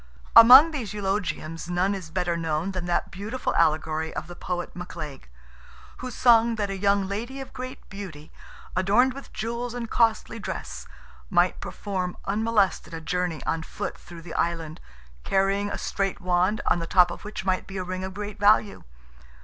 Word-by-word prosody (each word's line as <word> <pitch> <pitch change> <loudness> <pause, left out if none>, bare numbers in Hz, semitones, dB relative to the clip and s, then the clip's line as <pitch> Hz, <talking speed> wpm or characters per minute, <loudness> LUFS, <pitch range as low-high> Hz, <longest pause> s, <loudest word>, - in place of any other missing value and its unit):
Among 255 +8 +10
these 240 -10 -4
eulogiums 190 -5 -3
none 180 +3 +1
is 185 -5 -6
better 175 0 -1
known 165 +2 -1
than 185 -2 -4
that 175 0 -1
beautiful 215 +7 -3
allegory 160 0 +1
of - - -3
the 175 +1 -10
poet 175 0 -4
McLaig, 165 -6 -7 0.7
who 255 - -6
sung 235 -1 +4
that 205 -2 -2
"a - - -3
young 200 0 +2
lady 235 +7 -4
of 270 - -8
great 255 0 -8
beauty, 180 -7 -9 0.4
adorned 240 +7 +3
with 275 +1 -10
jewels 235 +2 -4
and 240 -1 -4
costly 230 -1 +1
dress, - - -6 0.4
might - - +2
perform 185 -3 -4
unmolested 200 -5 +1
a - - -5
journey 175 +1 -2
on 165 - -1
foot - - -5
through 170 -1 -12
the 175 - -9
Island, 165 -2 -2 0.4
carrying 195 +1 +1
a - - -4
straight 195 0 -2
wand, 185 +3 +1
on - - +2
the 165 - -4
top 180 -1 +5
of - - -8
which 210 -2 -6
might 185 -1 0
be 195 - -7
a 185 - -2
ring 185 +1 -4
of 190 0 -6
great 210 0 -6
value." 205 0 +3
195 Hz, 175 wpm, -26 LUFS, 175-215 Hz, 0.7 s, Among